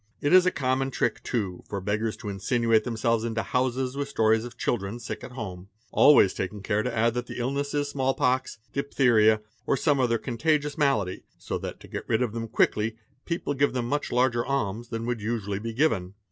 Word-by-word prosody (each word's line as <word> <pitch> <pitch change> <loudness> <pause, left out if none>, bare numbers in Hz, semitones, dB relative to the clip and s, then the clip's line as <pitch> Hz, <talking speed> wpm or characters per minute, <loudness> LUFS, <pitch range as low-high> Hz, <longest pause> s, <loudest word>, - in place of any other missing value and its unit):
It 145 - +1
is 185 0 +7
a - - +4
common 135 -1 0
trick, - - -1
too, 100 -7 -3
for 100 - -3
beggars 105 +3 -1
to 105 - -6
insinuate 110 +3 +1
themselves 115 -1 0
into 115 -1 -1
houses 130 +1 -1
with 140 0 -3
stories 110 -3 +2
of 120 -2 -10
children 105 -2 -2
sick 115 - -6
at 125 - -9
home, 95 -6 -7 0.2
always 120 -10 +6
taking 95 +2 -4
care 105 +1 +1
to 125 - -2
add 115 0 +2
that 125 0 -3
the - - -7
illness 140 +4 -2
is 145 0 0
small 135 -1 0
pox, 130 -2 0 0.2
diphtheria, 115 -6 +3 0.3
or 140 - +2
some 145 -2 +2
other 120 -2 +2
contagious 145 +5 0
malady, 115 - +1 0.2
so - - -4
that - - -6
to - - -12
get - - -7
rid 110 +3 +2
of 120 - -2
them 115 0 -4
quickly 110 0 +1 0.3
people 170 -4 -2
give 140 0 +1
them 125 -2 -1
much 145 +4 -1
larger 120 -1 +2
alms 120 -4 -2
than 115 0 -4
would 120 -2 -2
usually 105 -3 -2
be 115 +2 -4
given. 110 -8 0
120 Hz, 205 wpm, -26 LUFS, 110-135 Hz, 0.3 s, is